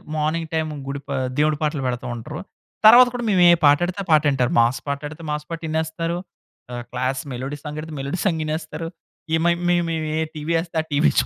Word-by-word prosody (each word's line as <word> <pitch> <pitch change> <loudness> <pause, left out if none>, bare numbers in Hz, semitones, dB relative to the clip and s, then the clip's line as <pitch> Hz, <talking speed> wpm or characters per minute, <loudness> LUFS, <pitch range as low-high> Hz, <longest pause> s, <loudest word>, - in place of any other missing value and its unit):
Morning 155 +2 -1
time 160 -1 0 0.2
గుడి 140 0 -4
పా 140 - -2 0.2
దేవుడి 150 0 +2
పాటలు 150 -2 0
పెడతా 125 +1 -3
ఉంటారు. 150 +7 -7 0.5
తరువాత 245 +3 +9
కూడా 240 - -3
మేము 185 - +3
ఏ - - +7
పాట 145 0 +7
ఎడితే 185 +2 -5
ఆ - - -29
పాట 155 -1 +6
వింటారు. 130 -3 +1
మాస్ 120 +3 +2
పాట 140 0 -1
ఎడితే 155 +2 -10
మాస్ 150 0 -3
పాట 165 -1 -4
వినేస్తారు. 160 +2 -2 0.5
ఆహ్, 120 0 -5
క్లాస్ 130 +2 -1
మెలోడీ 135 +4 -5
సాంగ్ 150 0 -6
ఎడితే 160 0 -8
మెలోడీ 140 +7 -3
సాంగ్ 170 -5 +1
వినేస్తారు. 155 +1 -4 0.5
ఈ 160 - +5
మే 175 - +5 0.2
మేము 175 -1 +2 0.3
ఏ - - +1 0.2
టీవీ 155 +2 -2
ఎస్తే 165 -1 -7
ఆ - - -20
టీవీ 145 +2 +3
155 Hz, 210 wpm, -22 LUFS, 140-165 Hz, 0.5 s, తరువాత